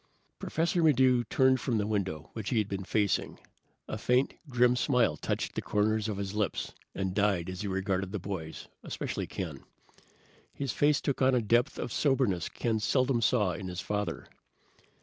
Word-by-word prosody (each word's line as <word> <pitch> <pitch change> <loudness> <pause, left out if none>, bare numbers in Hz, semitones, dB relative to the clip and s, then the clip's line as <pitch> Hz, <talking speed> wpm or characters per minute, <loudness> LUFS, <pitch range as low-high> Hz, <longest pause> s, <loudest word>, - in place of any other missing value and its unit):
Professor 170 +2 0
Maddox 130 -6 +4
turned 130 -1 +3
from 120 -2 0
the 105 - 0
window, 95 -7 -2
which 110 -3 -4
he 120 - 0
had 105 -2 +2
been 100 -1 -4
facing. 100 0 0 0.5
A - - -4
faint, 125 +2 +2 0.2
grim 125 -1 +4
smile 125 - +2
touched - - -3
the - - -2
corners 110 +1 +1
of 105 - -3
his 100 0 -3
lips 105 -4 -2 0.2
and 95 -1 -2
died 100 -3 +1
as 90 - -6
he 105 - -3
regarded 95 0 -1
the 105 - -2
boys, 90 -5 -6
especially - - -4
Ken. - - -5 0.9
His 140 -3 -2
face 145 +4 +2
took 140 - -2
on 130 0 +4
a - - +4
depth 120 +3 +2
of - - -4
soberness 130 - +1
Ken 115 -2 -1
seldom 130 +2 +2
saw 105 -5 +3
in 95 +1 -5
his 90 0 -5
father. 105 0 -3
105 Hz, 175 wpm, -30 LUFS, 95-125 Hz, 0.9 s, Maddox